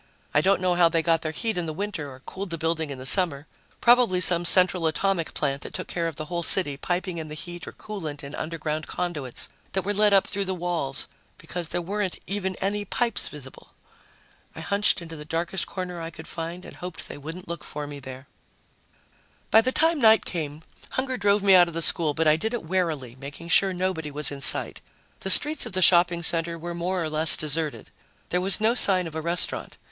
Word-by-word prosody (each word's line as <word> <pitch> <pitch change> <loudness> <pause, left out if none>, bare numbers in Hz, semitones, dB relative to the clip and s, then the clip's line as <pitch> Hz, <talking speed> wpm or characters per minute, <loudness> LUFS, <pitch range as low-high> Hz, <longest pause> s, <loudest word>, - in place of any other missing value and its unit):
I 145 - +4
don't 190 +2 +2
know 180 -1 +2
how 175 -1 +4
they 165 0 0
got 165 -1 +2
their 155 - -3
heat 220 +4 -2
in 170 - -3
the 155 - -4
winter 185 -6 -4
or 130 0 -13
cooled 190 +7 -7
the 165 - -4
building 160 -1 -2
in 140 - -6
the 130 - -9
summer. 145 -1 +3 0.4
Probably 240 -6 +4
some 175 -1 +5
central 180 -1 +4
atomic 170 +1 -1
plant 140 -2 -2
that - - -8
took 185 - -5
care 170 -1 -2
of 165 - -5
the 155 - -6
whole 175 +1 -4
city, 170 -4 +4
piping 175 +3 -3
in 160 - -6
the 150 - -8
heat 175 +2 -6
or - - -6
coolant 160 -9 -7
in 140 +1 -9
underground 155 -1 -4
conduits 150 -8 -4 0.3
that 190 - -1
were 205 - -1
led 210 0 +3
up 195 -1 +4
through 200 0 -2
the 190 0 -3
walls, 170 -6 -3 0.3
because 175 -2 -6
there 175 - -3
weren't 200 +1 -3
even 190 -1 -3
any 205 +3 -2
pipes 230 +3 -1
visible. 135 -3 -12 0.8
I - - -7
hunched 200 -3 0
into 165 -1 -9
the 150 - -8
darkest 170 +4 -3
corner 180 -2 -6
I 165 - -5
could 160 0 -12
find 170 +2 -6
and - - -12
hoped 180 -2 -7
they - - -9
wouldn't 165 +5 -9
look 170 -1 -6
for 150 0 -6
me 145 0 -8
there. 130 0 -10 1.2
By 220 - +7
the 255 +3 -1
time 325 +3 +2
night 220 -1 +5
came, 155 -3 -5 0.3
hunger 260 0 -2
drove 205 -3 +1
me 195 -1 +5
out 180 -2 +7
of 170 - -8
the 165 - -2
school, 155 -4 +4
but 165 - 0
I 155 0 +4
did 220 +8 -2
it 235 - -5
warily, 160 -8 -2
making 145 +5 -9
sure 195 +3 +5
nobody 180 -4 -2
was 150 +1 -1
in 140 -1 -7
sight. - - +4 0.4
The 190 - -5
streets 295 +9 +3
of - - -11
the 185 - 0
shopping 175 0 +4
center 170 0 +1
were 170 +1 -6
more 175 +1 -2
or 160 - -3
less 155 +1 +7
deserted. 155 0 +1 0.4
There 180 - 0
was 190 +1 +2
no 220 +2 +2
sign 190 -7 +4
of 165 - -7
a 160 - -4
restaurant. 170 +2 -1
170 Hz, 225 wpm, -25 LUFS, 155-190 Hz, 1.2 s, By